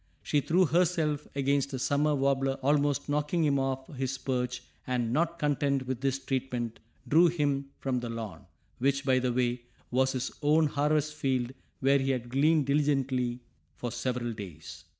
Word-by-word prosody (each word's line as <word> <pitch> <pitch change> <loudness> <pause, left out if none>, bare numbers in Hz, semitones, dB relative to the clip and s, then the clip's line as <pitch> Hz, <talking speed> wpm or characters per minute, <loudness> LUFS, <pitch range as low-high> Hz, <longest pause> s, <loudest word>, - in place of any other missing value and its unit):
She 145 - +1
threw 180 +6 +3
herself 160 -3 +1
against 140 0 +1
a - - -1
summer 145 +3 +1
warbler 135 -1 +1
almost 145 0 +2
knocking 150 +3 0
him 140 -2 +2
off 135 0 -1
his 135 0 -2
perch 125 -2 -2 0.2
and, 120 -2 0
not 170 +3 +1
content 140 -3 0
with 130 -1 -3
this 135 -1 +1
treatment, 130 -3 -3 0.3
drew 165 +4 +6
him 145 -4 0
from 130 -2 -1
the 120 -1 -5
lawn, 110 -4 -6 0.3
which, 140 +2 +1
by 130 -1 +4
the 125 -1 0
way, 120 0 0 0.3
was 130 +1 +2
his 130 -1 -2
own 155 +2 +4
harvest 150 +1 +1
field 130 -4 -1 0.3
where 140 +1 +4
he 135 0 -1
had 125 -2 -1
gleaned 150 +3 +3
diligently 135 -4 +1 0.3
for 120 +6 -4
several 120 -1 -2
days. 90 -8 -9
135 Hz, 165 wpm, -29 LUFS, 125-145 Hz, 0.3 s, drew